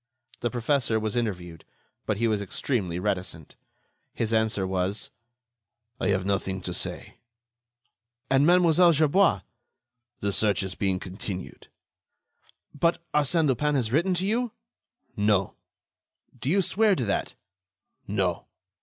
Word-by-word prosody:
The 120 Hz, -, -1 dB
professor 120 Hz, -2 st, 0 dB
was 110 Hz, 0 st, -3 dB
interviewed, 90 Hz, -8 st, -3 dB, 0.4 s
but 105 Hz, -, 0 dB
he 115 Hz, +2 st, +1 dB
was 105 Hz, -2 st, 0 dB
extremely 100 Hz, -3 st, -2 dB
reticent. 90 Hz, -5 st, -3 dB, 0.6 s
His 115 Hz, 0 st, -1 dB
answer 110 Hz, -3 st, +1 dB
was: 95 Hz, +2 st, -2 dB, 0.9 s
"I -, -, 0 dB
have 95 Hz, -2 st, +1 dB
nothing 95 Hz, -1 st, -1 dB
to 90 Hz, -1 st, -4 dB
say." -, -, -5 dB, 1.1 s
"And 135 Hz, +1 st, +3 dB
Mlle. 175 Hz, -1 st, +5 dB
Gerbois?" 160 Hz, +5 st, +3 dB, 0.8 s
"The 100 Hz, -, -1 dB
search 105 Hz, +1 st, +2 dB
is 95 Hz, -1 st, -4 dB
being 95 Hz, -2 st, 0 dB
continued." 95 Hz, 0 st, -6 dB, 1.1 s
"But 170 Hz, +3 st, +1 dB
Arsène 150 Hz, +2 st, +3 dB
Lupin 145 Hz, +3 st, +1 dB
has 120 Hz, -5 st, 0 dB
written 175 Hz, +7 st, +2 dB
to 180 Hz, +2 st, 0 dB
you?" 230 Hz, +2 st, 0 dB, 0.6 s
"No." 105 Hz, -2 st, +2 dB, 0.8 s
"Do 130 Hz, +2 st, -4 dB
you 195 Hz, +4 st, +3 dB
swear 205 Hz, +3 st, +3 dB
to 125 Hz, -, -1 dB
that?" 100 Hz, -, -2 dB, 0.7 s
"No." -, -, -1 dB
110 Hz, 125 wpm, -26 LUFS, 95-150 Hz, 1.1 s, Mlle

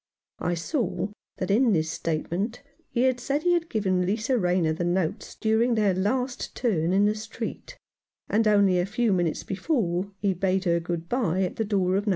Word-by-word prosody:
I 175 Hz, -, 0 dB
saw 185 Hz, -, -2 dB, 0.3 s
that 185 Hz, 0 st, -2 dB
in 230 Hz, +2 st, +4 dB
this 160 Hz, -2 st, +1 dB
statement 175 Hz, -, -2 dB, 0.3 s
he 255 Hz, +1 st, +2 dB
said 280 Hz, +4 st, -1 dB
he 355 Hz, -, +4 dB
had 335 Hz, -1 st, 0 dB
given 190 Hz, -4 st, +1 dB
Lisa 215 Hz, +7 st, 0 dB
Rayner 180 Hz, -6 st, +2 dB
the 165 Hz, -, -3 dB
notes 175 Hz, -1 st, -1 dB
during 225 Hz, +2 st, +2 dB
their 210 Hz, -3 st, +3 dB
last 250 Hz, +7 st, -1 dB
turn 180 Hz, -9 st, +1 dB
in 195 Hz, +2 st, +4 dB
the 210 Hz, -, +3 dB
street, 225 Hz, -, -7 dB, 0.5 s
and 220 Hz, +1 st, +2 dB
only 200 Hz, -3 st, +4 dB
a 175 Hz, -, 0 dB
few 220 Hz, +1 st, +1 dB
minutes 175 Hz, -3 st, 0 dB
before 195 Hz, -, -1 dB
he 200 Hz, -2 st, +1 dB
bade 190 Hz, +1 st, 0 dB
her 170 Hz, -2 st, +2 dB
good 170 Hz, 0 st, -4 dB
bye 190 Hz, -7 st, +1 dB
at 180 Hz, -, -3 dB
the 225 Hz, -, 0 dB
door 190 Hz, -3 st, +1 dB
of 205 Hz, +2 st, -2 dB
No. -, -, +3 dB
195 Hz, 190 wpm, -26 LUFS, 180-230 Hz, 0.5 s, in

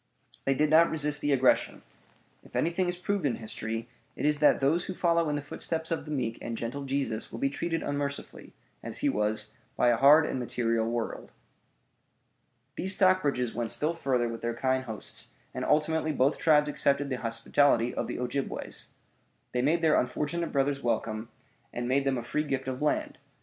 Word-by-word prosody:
They 135 Hz, -, +2 dB
did 150 Hz, +2 st, +2 dB
not 165 Hz, +2 st, +6 dB
resist 150 Hz, -1 st, -1 dB
the 145 Hz, -, +1 dB
aggression. 130 Hz, -2 st, +2 dB, 0.6 s
If -, -, -16 dB
anything 175 Hz, +2 st, +1 dB
is 175 Hz, -, -3 dB
proved 200 Hz, +1 st, -1 dB
in 135 Hz, -5 st, +1 dB
history, 115 Hz, +1 st, -5 dB, 0.3 s
it -, -, -3 dB
is 150 Hz, 0 st, +2 dB
that 150 Hz, -, +5 dB
those 155 Hz, +6 st, +2 dB
who 185 Hz, -, -5 dB
follow 170 Hz, -2 st, +2 dB
in 150 Hz, -, 0 dB
the 145 Hz, -, -3 dB
footsteps 160 Hz, +2 st, -4 dB
of 165 Hz, -, -2 dB
the 150 Hz, -, -7 dB
meek 125 Hz, -6 st, -2 dB
and 115 Hz, -1 st, -4 dB
gentle 130 Hz, +5 st, -4 dB
Jesus 135 Hz, -5 st, -2 dB
will -, -, -6 dB
be 135 Hz, +3 st, 0 dB
treated 165 Hz, +2 st, -2 dB
unmercifully, 145 Hz, 0 st, -4 dB, 0.3 s
as -, -, -5 dB
he -, -, +4 dB
was, 105 Hz, 0 st, -1 dB, 0.2 s
by 120 Hz, -, +3 dB
a 120 Hz, -, +3 dB
hard 145 Hz, +5 st, +7 dB
and 130 Hz, -, -2 dB
material 115 Hz, -2 st, 0 dB
world. 115 Hz, -1 st, -4 dB, 1.5 s
These 190 Hz, +1 st, 0 dB
Stockbridges 150 Hz, -, +2 dB
went 120 Hz, -1 st, -2 dB
still 155 Hz, +3 st, 0 dB
further 130 Hz, -7 st, 0 dB
with 115 Hz, 0 st, -6 dB
their 120 Hz, 0 st, -2 dB
kind 130 Hz, +1 st, 0 dB
hosts, 110 Hz, -3 st, -6 dB, 0.2 s
and -, -, -4 dB
ultimately 155 Hz, +1 st, +1 dB
both 140 Hz, 0 st, +1 dB
tribes 150 Hz, -2 st, +4 dB
accepted 140 Hz, -1 st, +1 dB
the 130 Hz, -, -1 dB
hospitality 120 Hz, +1 st, +2 dB
of -, -, -2 dB
the -, -, -4 dB
Ojibways. 130 Hz, +2 st, -4 dB, 0.6 s
They 125 Hz, -, 0 dB
made 165 Hz, +6 st, +2 dB
their 155 Hz, -1 st, +5 dB
unfortunate 150 Hz, +7 st, -2 dB
brothers 140 Hz, 0 st, +1 dB
welcome, 110 Hz, -1 st, -2 dB, 0.4 s
and 120 Hz, 0 st, -3 dB
made 135 Hz, +2 st, +2 dB
them 135 Hz, -1 st, +1 dB
a 120 Hz, -, -4 dB
free 150 Hz, +5 st, -1 dB
gift 135 Hz, -3 st, -3 dB
of 130 Hz, +1 st, -4 dB
land. 150 Hz, -, -1 dB
140 Hz, 185 wpm, -29 LUFS, 120-155 Hz, 1.5 s, hard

